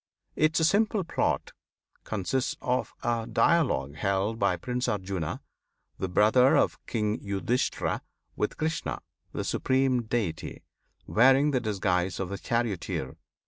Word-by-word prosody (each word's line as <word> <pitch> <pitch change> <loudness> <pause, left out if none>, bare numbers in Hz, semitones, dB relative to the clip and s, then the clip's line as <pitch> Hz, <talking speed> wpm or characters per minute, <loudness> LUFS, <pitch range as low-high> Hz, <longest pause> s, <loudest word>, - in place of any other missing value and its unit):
Its 160 +1 +3
simple 210 +1 +2
plot 165 - -1 0.5
consists 110 +6 -1
of 125 +1 -1
a 115 -1 0
dialogue 125 - +2
held 100 +6 0
by - - +2
Prince 125 0 -2
Arjuna, 95 -5 -2 0.6
the 95 - -2
brother 110 +7 +5
of - - +1
King 105 -2 -1
Yudhisthira, 100 +5 -1 0.3
with 105 - -2
Krishna, 160 0 -2 0.3
the - - -3
Supreme 130 -1 +1
Deity, 110 -8 -3 0.4
wearing 135 +5 +5
the 130 -3 +1
disguise 95 -4 0
of 95 -1 -3
a 100 - -4
charioteer. 110 - -2
115 Hz, 120 wpm, -28 LUFS, 95-130 Hz, 0.6 s, brother